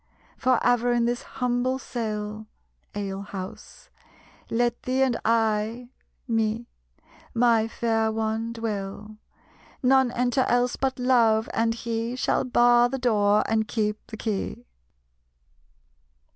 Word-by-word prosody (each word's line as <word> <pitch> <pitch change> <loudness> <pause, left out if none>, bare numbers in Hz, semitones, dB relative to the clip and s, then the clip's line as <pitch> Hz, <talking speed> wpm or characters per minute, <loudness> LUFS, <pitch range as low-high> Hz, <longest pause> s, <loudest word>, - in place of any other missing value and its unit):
"For 255 -2 +2
ever 245 0 +3
in 240 -1 +2
this 240 0 -1
humble 250 +1 -1
cell 215 -4 -5 0.5
[ale 195 -1 -3
house] 195 -2 -9 0.6
Let 240 0 0
thee 260 +1 +1
and 255 -3 +1
I 225 +1 0 0.4
[me], 225 0 0 0.7
my 230 -2 +3
fair 225 -1 0
one, 220 +1 -2
dwell; 215 -2 -5 0.7
None 265 -1 +4
enter 250 +2 +1
else 245 0 +2
but 265 -1 -1
Love, 235 -4 +3
and 230 0 +1
he 230 +1 -3
Shall 255 - +1
bar 240 -1 +4
the 270 - -3
door 210 -4 +3
and 220 -1 +1
keep 210 -2 -2
the 220 - -8
key." 200 - -3
230 Hz, 115 wpm, -25 LUFS, 220-245 Hz, 0.7 s, None